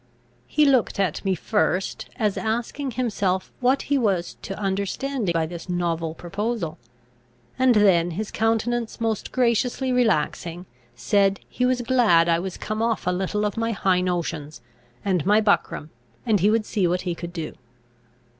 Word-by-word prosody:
He 300 0 +3
looked 260 -7 +2
at 185 -6 0
me 190 -2 +1
first, 190 0 -1
as 210 -3 0
asking 235 +5 -2
himself 195 -6 0
what 255 +2 +2
he 285 -1 +1
was 195 -7 0
to 195 - -6
understand 200 +3 -1
by 165 -1 +1
this 170 +2 -8
novel 165 -2 -1
proposal; 195 -1 -3 0.8
and 255 -2 +5
then, 185 -5 +4
his 200 +5 -4
countenance 225 +1 0
most 225 -2 -2
graciously 250 +1 +1
relaxing, 180 -6 0 0.3
said, 195 +12 +2
he 250 - 0
was 250 -1 +1
glad 225 -10 +4
I 165 -1 +3
was 185 +1 -5
come 215 +1 -3
off 230 -2 0
a 180 - +2
little 190 +3 -1
of 210 +2 -2
my 230 0 0
high 190 -3 +2
notions 165 -6 -3 0.4
and 185 -6 +1
my 210 +3 +4
buckram, 200 -7 0 0.3
and 215 -4 +3
he 200 +4 +4
would 220 0 +2
see 200 -5 +1
what 180 +1 0
he 180 -2 -2
could 170 0 -7
do. 165 -3 -5
200 Hz, 160 wpm, -24 LUFS, 175-230 Hz, 0.8 s, and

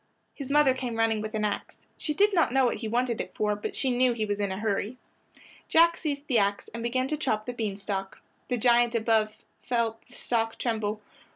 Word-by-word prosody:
His 275 -2 -7
mother 290 -2 +5
came 250 -3 -4
running 225 -1 +1
with 215 +1 -5
an 215 0 0
ax. 205 - -3 0.2
She 300 - -3
did 410 +5 +4
not 335 -8 +3
know 265 0 +4
what 240 - +1
he 225 - -5
wanted 240 +1 0
it - - -9
for, 210 -1 +1
but 205 - -5
she 265 - +1
knew 250 0 +3
he 220 -2 -1
was 205 -1 -2
in 200 -2 -1
a 190 - -3
hurry. 215 +3 -2 0.7
Jack 335 +1 +5
seized 285 -2 -3
the 250 -6 +3
ax 200 0 0
and 230 - -5
began 255 +2 0
to 305 - -1
chop 215 -7 -1
the 245 - -4
bean 215 -4 -3
stalk. 195 -1 -4 0.3
The 250 - 0
giant 240 0 +4
above 220 -1 +1 0.2
felt 230 -2 -1
the 245 - -19
stalk 225 -2 -1
tremble. 215 -3 -2
230 Hz, 220 wpm, -27 LUFS, 215-255 Hz, 0.7 s, mother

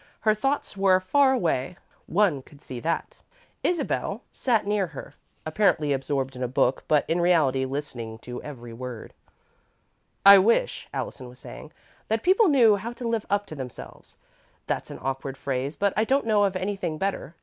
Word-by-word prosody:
Her 215 0 +4
thoughts 270 +3 -2
were 195 -1 +4
far 270 +9 +3
away 170 - -1 0.3
one 180 -7 +2
could 140 +2 -18
see 125 -3 -8
that. 165 +5 -3 0.4
Isabel 350 -2 -1
sat 230 -6 0
near 205 -2 0
her, 150 -4 -10 0.3
apparently 155 -4 +2
absorbed 135 -1 -2
in 125 - -8
a 125 - 0
book, 125 +1 +1
but, 150 -2 +2
in 170 +1 +1
reality, 150 -7 +3
listening 130 -5 -5
to 125 0 -7
every 120 -5 -9
word. 125 -1 -8 1.1
"I 200 0 +11
wish," 230 - +1
Allison 125 -2 -5
was 125 - -15
saying, 155 - -11 0.4
"that 220 0 -1
people 385 +4 +5
knew 235 -9 +5
how 230 +4 -6
to 240 0 -5
live 230 -2 -1
up 205 0 +1
to 155 - -9
themselves. 130 -4 -10 0.5
That's - - -3
an - - -7
awkward 135 0 -3
phrase, 135 +1 -3
but 200 -1 +1
I 215 - +2
don't 270 +4 +1
know 210 -2 +3
of 195 -1 -1
anything 185 -4 -3
better. 190 -4 -3
170 Hz, 170 wpm, -25 LUFS, 135-210 Hz, 1.1 s, I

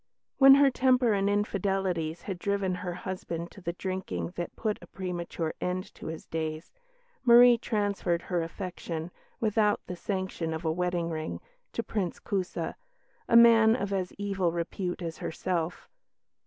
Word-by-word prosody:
When 270 0 +10
her 280 -1 +5
temper 255 -3 +3
and 200 0 +1
infidelities 190 -5 -1
had 190 -3 -5
driven 200 -1 0
her 180 -1 -4
husband 175 -2 -5
to 195 - -13
the 170 -1 -3
drinking 175 - -4
that 175 - -5
put 215 -2 -2
a - - -12
premature 175 -3 -4
end 180 +1 -3
to - - -9
his 160 0 -6
days, 160 0 -4 0.5
Marie 240 -1 +8
transferred 200 -6 -1
her 175 -2 -1
affection, 170 -1 -5 0.3
without 215 -1 +2
the 180 - -5
sanction 185 -4 -3
of 160 +2 -6
a 160 - +2
wedding 175 0 -1
ring, 155 0 -4 0.3
to 230 - -2
Prince 195 -7 -2
Kusa, 190 -3 -2 0.6
a - - +4
man 230 -1 +8
of 200 -5 -2
as 185 -2 -1
evil 195 -3 0
repute 175 +2 -3
as 165 -1 -5
herself. 175 0 -3
185 Hz, 155 wpm, -29 LUFS, 170-205 Hz, 0.6 s, When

